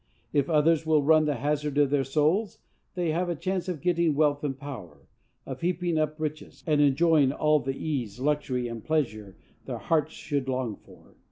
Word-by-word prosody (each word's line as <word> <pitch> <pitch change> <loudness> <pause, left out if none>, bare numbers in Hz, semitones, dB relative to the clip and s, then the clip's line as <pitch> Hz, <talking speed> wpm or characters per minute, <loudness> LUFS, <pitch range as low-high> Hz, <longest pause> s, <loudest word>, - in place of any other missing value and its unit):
If 145 0 +1
others 160 0 +3
will 155 -2 +2
run 155 +1 +5
the 145 -1 0
hazard 145 +2 -2
of 145 -2 +3
their 145 -2 +2
souls, 155 - +1 0.4
they 175 -3 0
have 175 +3 -1
a 175 - -1
chance 185 +3 -3
of 170 -5 -4
getting 170 -3 +2
wealth 145 -1 +2
and 135 -3 -2
power, 135 - -9 0.4
of - - -7
heaping 175 -1 0
up 155 0 -1
riches, 155 0 -5
and 150 -2 +2
enjoying 145 0 +4
all 150 +1 +2
the 135 0 -4
ease, 125 -8 -3
luxury 135 -3 -1
and 115 -2 -7
pleasure 110 -11 -2 0.3
their - - -4
hearts 160 -1 0
should 140 -3 -3
long 125 -4 -2
after. - - -19
150 Hz, 185 wpm, -27 LUFS, 135-160 Hz, 0.4 s, run